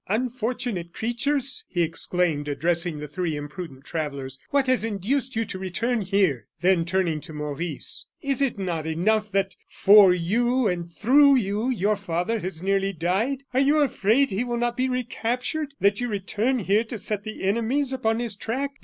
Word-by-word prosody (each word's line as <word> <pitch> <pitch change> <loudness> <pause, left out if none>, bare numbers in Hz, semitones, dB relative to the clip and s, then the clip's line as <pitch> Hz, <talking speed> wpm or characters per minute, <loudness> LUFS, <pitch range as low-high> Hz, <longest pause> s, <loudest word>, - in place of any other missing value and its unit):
"Unfortunate 235 -4 -2
creatures!" 260 +3 -1
he 175 -2 +1
exclaimed, 165 -2 -1
addressing 170 +3 0
the 150 0 -6
three 160 +1 -2
imprudent 145 -2 -7
travellers, 140 -4 -4
"what 280 -1 +2
has 255 -3 +2
induced 225 +5 -1
you 225 0 0
to 185 - -6
return 220 +6 -1
here?" 190 - +1
Then 180 -2 +3
turning 170 -3 0
to 160 - -9
Maurice: 150 +2 -4
"Is 275 -2 -1
it 275 -6 +1
not 170 -5 -3
enough 210 +6 +1
that 195 -1 0
for 200 -1 +7
you, 235 +8 +1
and 175 -2 -2
through 275 - +5
you, 215 0 0
your 210 -3 +1
father 185 +4 -1
has 185 -3 -5
nearly 195 0 +1
died? 195 - -1
Are 255 - +3
you 285 +3 +4
afraid 255 0 +2
he 195 +5 0
will 240 -1 -2
not 240 0 0
be 255 +1 0
recaptured, 250 +4 -2
that 200 +3 +2
you 245 - 0
return 215 +4 0
here 210 0 +2
to 230 0 -5
set 205 0 -2
the 215 -1 -7
enemies 235 +7 +1
upon 225 -4 0
his 235 -4 -3
track? 260 +7 -3
205 Hz, 170 wpm, -25 LUFS, 175-245 Hz, -, for